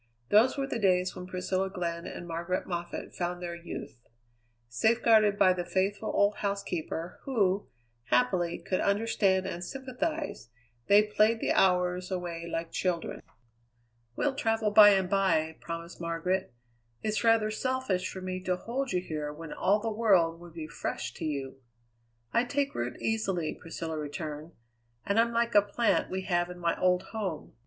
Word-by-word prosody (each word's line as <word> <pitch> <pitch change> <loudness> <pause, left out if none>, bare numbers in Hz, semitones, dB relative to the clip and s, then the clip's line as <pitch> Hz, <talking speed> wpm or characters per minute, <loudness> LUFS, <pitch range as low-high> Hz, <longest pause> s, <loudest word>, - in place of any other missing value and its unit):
Those 225 +7 +5
were 275 - 0
the 255 -3 -3
days 185 -2 +2
when 180 - -7
Priscilla 185 +1 -1
Glenn 170 -3 -4
and 175 - -7
Margaret 170 +2 -2
Moffatt 175 -1 -5
found 175 0 -3
their 175 -1 -5
youth. 170 -7 -8 0.7
Safeguarded 215 - +4
by 185 -2 +5
the 180 -1 -3
faithful 195 +3 -1
old 205 +1 +2
housekeeper, 180 -4 -3
who, 205 -7 +1 0.4
happily, 145 +9 +2
could 185 +2 -2
understand 200 -2 +2
and 175 +1 -4
sympathize, 270 - -4 0.4
they 205 +1 +7
played 215 +2 +2
the - - 0
hours 180 -1 +2
away 170 -2 -4
like 165 0 -3
children. 180 -3 -2 0.9
"We'll 285 - +1
travel 225 -4 0
by 210 0 +10
and 190 -2 +3
by," 165 -5 +1
promised 170 +1 -7
Margaret. 170 +2 -1 0.5
"It's 215 +1 0
rather 225 -2 +4
selfish 235 -6 -1
for 190 - -7
me 185 0 -4
to 185 - +1
hold 245 +5 -3
you 180 - +1
here 150 -4 -4
when 155 +1 -8
all 200 +3 +2
the 225 +1 -2
world 190 -7 +3
would 170 -1 -13
be 160 -2 -5
fresh - - -4
to - - -6
you." 135 -3 -4 0.7
"I 235 - +3
take 280 +2 -1
root 120 +1 -3
easily," 195 -8 -1
Priscilla 165 -1 -5
returned, 150 +1 -6 0.5
"and 200 +3 +2
I'm 235 +1 +3
like 235 0 +1
a 205 - +8
plant 205 +4 +1
we 190 0 -3
have 175 -1 0
in 180 - -8
my 170 -1 0
old 180 0 +3
home. 195 -8 -4
185 Hz, 160 wpm, -29 LUFS, 170-215 Hz, 0.9 s, by